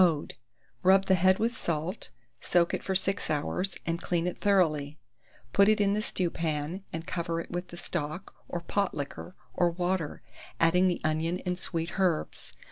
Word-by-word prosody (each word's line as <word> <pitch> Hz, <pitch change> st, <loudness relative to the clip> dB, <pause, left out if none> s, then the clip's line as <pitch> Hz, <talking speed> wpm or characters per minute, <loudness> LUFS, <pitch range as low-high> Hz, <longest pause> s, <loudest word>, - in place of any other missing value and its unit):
Mode. 160 Hz, -5 st, +1 dB, 0.5 s
Rub 195 Hz, +1 st, +5 dB
the 190 Hz, -, +4 dB
head 185 Hz, +1 st, +5 dB
with 235 Hz, +2 st, 0 dB
salt, 170 Hz, 0 st, -3 dB, 0.3 s
soak 175 Hz, -1 st, +2 dB
it -, -, -1 dB
for 190 Hz, -, -2 dB
6 195 Hz, +1 st, 0 dB
hours, 175 Hz, +5 st, -1 dB
and 170 Hz, +1 st, -1 dB
clean 175 Hz, -1 st, 0 dB
it 180 Hz, -, -3 dB
thoroughly; 155 Hz, -8 st, +2 dB, 0.6 s
put 200 Hz, +1 st, +6 dB
it 215 Hz, 0 st, +4 dB
in 200 Hz, -1 st, +3 dB
the 210 Hz, -, +1 dB
stewpan, 165 Hz, -2 st, -1 dB
and 165 Hz, 0 st, -5 dB
cover 170 Hz, -2 st, -2 dB
it 170 Hz, -, -7 dB
with 175 Hz, +1 st, -3 dB
the 175 Hz, -, -10 dB
stock, 175 Hz, +2 st, -4 dB, 0.2 s
or 175 Hz, -, -3 dB
pot 200 Hz, +3 st, 0 dB
liquor, 145 Hz, +5 st, -6 dB, 0.2 s
or 175 Hz, -1 st, +3 dB
water, 175 Hz, -2 st, -2 dB, 0.4 s
adding 180 Hz, +3 st, +5 dB
the 175 Hz, -, 0 dB
onion 160 Hz, +3 st, 0 dB
and 180 Hz, 0 st, -1 dB
sweet 170 Hz, +2 st, -3 dB
herbs. 180 Hz, -5 st, 0 dB
175 Hz, 175 wpm, -29 LUFS, 165-190 Hz, 0.6 s, put